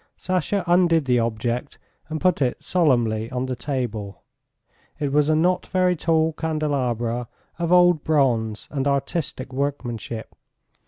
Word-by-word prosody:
Sasha 185 +2 -1
undid 170 -3 +3
the 125 -2 +3
object 115 +4 -2 0.3
and 155 0 -3
put 180 -3 +2
it 125 -2 0
solemnly 120 -10 +2
on 125 0 -2
the 130 -1 -3
table. 115 -6 -4 0.8
It 145 -3 -1
was 150 0 +3
a 155 - +4
not 180 +3 +1
very 185 -1 +2
tall 160 0 +1
candelabra 130 -7 -1 0.3
of 170 0 -1
old 175 -3 +5
bronze 120 -8 +1
and 140 -1 -1
artistic 140 -1 -2
workmanship. 120 -5 -4
140 Hz, 130 wpm, -23 LUFS, 120-160 Hz, 0.8 s, old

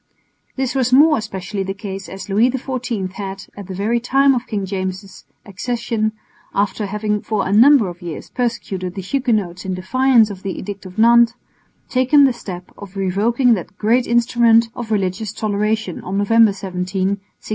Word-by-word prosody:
This 265 -2 -1
was 255 -2 0
more 300 +3 +6
especially 195 -2 -5
the 195 0 -3
case 195 -3 -7
as 195 +2 -8
Louis 210 +5 +3
XIV 250 -6 -3
had, 195 0 -7
at 200 -2 -9
the 190 - -6
very 220 +5 0
time 270 +3 +3
of 250 -1 -3
King 205 -3 -2
James' 190 0 -5 0.2
accession, 220 +1 -2 0.4
after 205 +1 0
having 210 +1 -2
for 215 -3 -2
a - - -2
number 245 0 +6
of 175 +1 -8
years 170 -3 -7
persecuted 195 -7 -3
the 195 - -5
Huguenots 210 -7 -1
in 185 -1 -3
defiance 235 +3 +3
of 190 -2 -9
the 195 -1 -4
Edict 200 0 -7
of 185 +2 -13
Nantes, 235 +1 +5 0.5
taken 260 +3 +4
the 265 -2 +4
step 185 -6 -8
of 200 -1 -11
revoking 215 +6 +2
that 180 -7 -5
great 235 +4 +2
instrument 235 -1 +3
of 235 -2 -6
religious 195 -1 -1
toleration 215 -2 -1
on 190 +2 -3
November 225 +2 +4
17, 190 -2 -6
1685. 190 +2 -1
210 Hz, 170 wpm, -19 LUFS, 190-235 Hz, 0.5 s, more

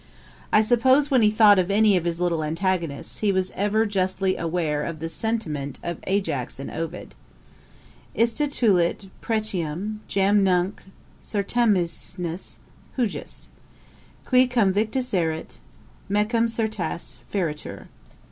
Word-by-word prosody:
I 215 - +5
suppose 260 +6 +3
when 260 -3 +5
he 210 - +5
thought 210 -2 +6
of 185 0 0
any 210 0 +4
of 175 -2 0
his 170 0 -1
little 170 -3 0
antagonists, 165 -2 -2
he 210 -2 +2
was 190 -1 0
ever 210 +3 +1
justly 190 -1 0
aware 160 -3 -1
of 165 0 -4
the 160 - -5
high - - -3
sentiment 155 - -3
of 170 -1 -4
Ajax 190 -11 -1
in 135 - -6
Ovid: 165 +2 -5 1.0
'Iste 235 +6 +1
tulit 195 -5 +1
pretium 210 -2 -2
jam 200 +1 +3
nunc 185 +1 +1 0.4
certaminis 190 -5 -1 0.4
hujus, 235 -5 -3 0.8
Qui, 255 0 +4
cùm 235 -6 +2
victus 225 +5 -1
erit, 160 -3 -2 0.5
mecum 215 +3 +2
certasse 220 -6 -3
feretur.' 165 -7 -3
195 Hz, 125 wpm, -24 LUFS, 170-220 Hz, 1.0 s, thought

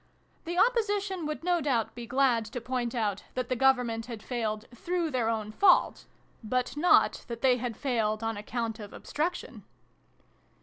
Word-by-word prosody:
"The 345 +1 -3
Opposition 410 -6 +1
would 305 +1 -4
no 350 -1 +2
doubt 255 -6 0
be 240 -1 -8
glad 255 -3 +2
to 240 +4 -5
point 245 0 -3
out 205 -4 -1
that 255 -1 -2
the 255 - +1
Government 245 -3 +2
had 230 -4 -7
failed 220 -3 -3
through 340 +5 -2
their 245 -4 0
own 215 -2 -2
fault; 370 - +4 0.4
but 250 +3 -1
not 340 +4 +4
that 235 -1 -6
they 255 -2 +5
had 245 -2 -4
failed 225 -5 0
on 225 0 -1
account 225 +2 -4
of 205 -2 -9
Obstruction 335 +4 -4
245 Hz, 165 wpm, -29 LUFS, 225-300 Hz, 0.4 s, they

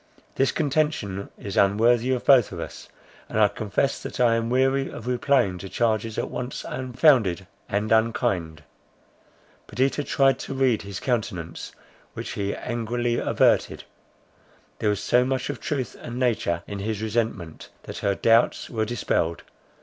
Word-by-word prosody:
This 135 - +2
contention 145 - -1
is 100 -1 -6
unworthy 115 +5 +3
of 125 -2 -1
both 130 -5 +6
of 90 - -6
us; - - -8 0.4
and 110 - -1
I 105 - +6
confess 110 +6 -1
that - - -7
I 120 -2 +4
am 115 0 0
weary 135 +2 +2
of 110 - -9
replying 125 -6 +1
to 95 +2 -8
charges 110 -1 0
at - - -2
once 125 +1 -5
unfounded 125 - +2 0.2
and 105 +1 -1
unkind." 110 -8 +1 1.0
Perdita 135 +3 0
tried 135 -1 +2
to 135 - -5
read 130 -4 +2
his 100 -2 -6
countenance, 100 -10 -3 0.4
which - - -5
he 100 0 -2
angrily 120 0 -2
averted. - - +2 1.0
There 105 - +1
was 105 -2 -1
so 125 +1 +4
much 130 +2 -1
of - - -8
truth 140 -5 -3
and 120 0 -6
nature 110 -9 0
in 100 - -6
his 105 +1 -3
resentment, 110 -7 -3
that - - -7
her 100 -1 0
doubts 115 +3 +2
were 110 -2 0
dispelled. 85 -7 -1
115 Hz, 150 wpm, -25 LUFS, 100-125 Hz, 1.0 s, both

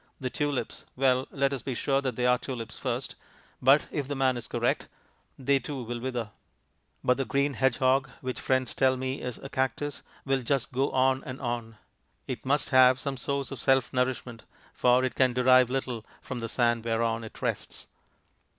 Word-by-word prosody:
The 130 -2 -3
tulips 145 -2 -2
well, 130 0 +2
let 140 0 0
us 135 - -3
be 130 +2 -4
sure 135 +2 +1
that 130 -4 -2
they 125 - 0
are 125 0 +4
tulips 120 -5 -6
first; - - -3 0.5
but, 135 +3 +5
if 145 -3 -2
the 145 - -3
man 130 -1 +2
is 120 - -6
correct, - - 0 0.5
they 135 +1 +2
too 135 0 -5
will 120 +1 -4
wither. 120 -3 -3 0.7
But 125 - +3
the 135 - -1
green 140 +2 +1
hedgehog 130 +1 +2
which 130 -1 -4
friends 130 -1 +1
tell 130 -1 +3
me 130 +1 -3
is 125 -2 -4
a - - -8
cactus 135 +2 -2 0.2
will 135 -1 +1
just 135 +1 -1
go 135 +3 +1
on 130 0 +2
and 130 +1 -7
on. 120 -3 -4 0.5
It - - -6
must 140 +1 +2
have 130 -1 +6
some 140 0 -3
source 140 +2 -2
of 135 - -6
self 135 -2 +2
nourishment, 125 -2 -1 0.3
for 125 +1 +4
it 130 - -2
can 130 -2 +3
derive 130 0 +5
little 125 -3 -2 0.2
from 130 -2 -6
the 115 -1 -4
sand 120 -1 +1
whereon 115 0 0
it 110 - -10
rests. - - -3
130 Hz, 185 wpm, -28 LUFS, 125-135 Hz, 0.7 s, have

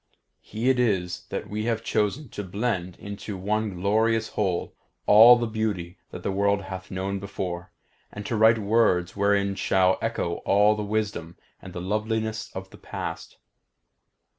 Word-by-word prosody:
He 110 +4 -4
it 130 - 0
is 95 -7 0
that - - -4
we 110 +1 -3
have 115 -2 -1
chosen 110 +8 0
to 105 - -6
blend 95 -2 -2
into 100 0 -7
one 105 +1 -1
glorious 110 +4 +1
whole 95 -4 -1 0.3
all 115 +4 +9
the 120 - -1
beauty 105 -5 -3
that - - -9
the - - -1
world 100 +1 +1
hath 95 -1 -7
known 95 +1 -3
before, 90 -2 -5 0.4
and 100 0 -8
to 115 - -2
write 110 +1 +5
words 100 -5 +2
wherein 100 -1 +2
shall 95 -1 +2
echo 115 -7 -2
all 105 +2 +3
the 105 - -4
wisdom 105 -5 -3 0.2
and 95 - -10
the 90 - -6
loveliness 110 +1 -2
of 95 0 -7
the - - -14
past. - - -6
100 Hz, 160 wpm, -25 LUFS, 95-110 Hz, 0.4 s, all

